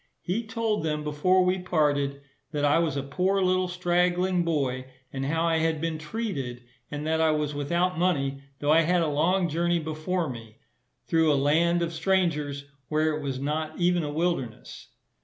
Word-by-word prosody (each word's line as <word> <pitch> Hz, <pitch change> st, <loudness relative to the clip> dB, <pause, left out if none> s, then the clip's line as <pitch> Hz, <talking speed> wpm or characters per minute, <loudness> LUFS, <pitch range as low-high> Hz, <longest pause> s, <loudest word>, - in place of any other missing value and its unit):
He 220 Hz, +6 st, -2 dB
told 225 Hz, -1 st, -1 dB
them, 150 Hz, -1 st, -1 dB
before 180 Hz, +5 st, +2 dB
we 185 Hz, +1 st, +1 dB
parted, 145 Hz, -5 st, 0 dB, 0.3 s
that 145 Hz, -1 st, 0 dB
I 145 Hz, +3 st, +4 dB
was 160 Hz, -4 st, 0 dB
a 140 Hz, -, -2 dB
poor 185 Hz, +8 st, 0 dB
little 185 Hz, 0 st, +2 dB
straggling 180 Hz, 0 st, +1 dB
boy, 135 Hz, -6 st, -1 dB, 0.3 s
and 135 Hz, 0 st, -3 dB
how 165 Hz, +3 st, 0 dB
I 165 Hz, -1 st, +2 dB
had 160 Hz, -1 st, 0 dB
been 165 Hz, 0 st, -2 dB
treated; 150 Hz, -, -4 dB, 0.3 s
and 150 Hz, 0 st, -5 dB
that 160 Hz, +1 st, +1 dB
I 160 Hz, -, +4 dB
was 150 Hz, -1 st, 0 dB
without 170 Hz, +5 st, 0 dB
money, 140 Hz, -6 st, 0 dB, 0.2 s
though 145 Hz, +1 st, +1 dB
I 160 Hz, +1 st, +6 dB
had 175 Hz, +1 st, +2 dB
a -, -, 0 dB
long 170 Hz, +5 st, +2 dB
journey 170 Hz, +2 st, +1 dB
before 160 Hz, +2 st, -2 dB
me, 115 Hz, -4 st, -9 dB, 0.5 s
through 160 Hz, -1 st, +3 dB
a -, -, +3 dB
land 170 Hz, +5 st, +2 dB
of 170 Hz, 0 st, -3 dB
strangers, 160 Hz, -5 st, 0 dB, 0.2 s
where 155 Hz, 0 st, +1 dB
it 155 Hz, -, -4 dB
was 135 Hz, -2 st, -3 dB
not 155 Hz, +3 st, -2 dB
even 175 Hz, 0 st, +2 dB
a 150 Hz, -, -3 dB
wilderness. 150 Hz, -8 st, -3 dB
160 Hz, 180 wpm, -27 LUFS, 145-180 Hz, 0.5 s, I